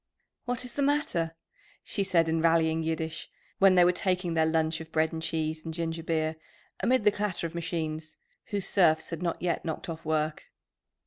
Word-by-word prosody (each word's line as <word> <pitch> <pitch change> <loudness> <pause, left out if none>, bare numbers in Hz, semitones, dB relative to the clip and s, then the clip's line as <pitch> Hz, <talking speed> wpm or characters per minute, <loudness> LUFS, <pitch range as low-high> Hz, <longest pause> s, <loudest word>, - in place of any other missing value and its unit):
"What 245 0 -2
is 245 - -7
the 285 - -2
matter?" 275 - +1 0.5
she 200 - -2
said 175 -4 +3
in 160 0 +1
rallying 165 -1 +3
Yiddish, 160 0 -3 0.3
when 195 -1 +6
they 180 -1 +7
were 180 - +5
taking 180 -1 0
their 160 -1 +3
lunch 160 0 +1
of 160 0 -10
bread 160 +1 +1
and 160 - -4
cheese 155 -1 -2
and 165 - -5
ginger 165 -1 -2
beer, 160 -1 -1 0.4
amid 255 -2 +2
the 210 - +5
clatter 205 -4 -2
of 165 - -4
machines, 160 -2 -4 0.3
whose 205 -3 -2
serfs 160 -5 +3
had 165 0 -4
not 170 -2 -1
yet 175 -2 0
knocked 160 +1 -4
off 165 -1 -6
work. 155 -1 -1
165 Hz, 190 wpm, -29 LUFS, 160-180 Hz, 0.5 s, they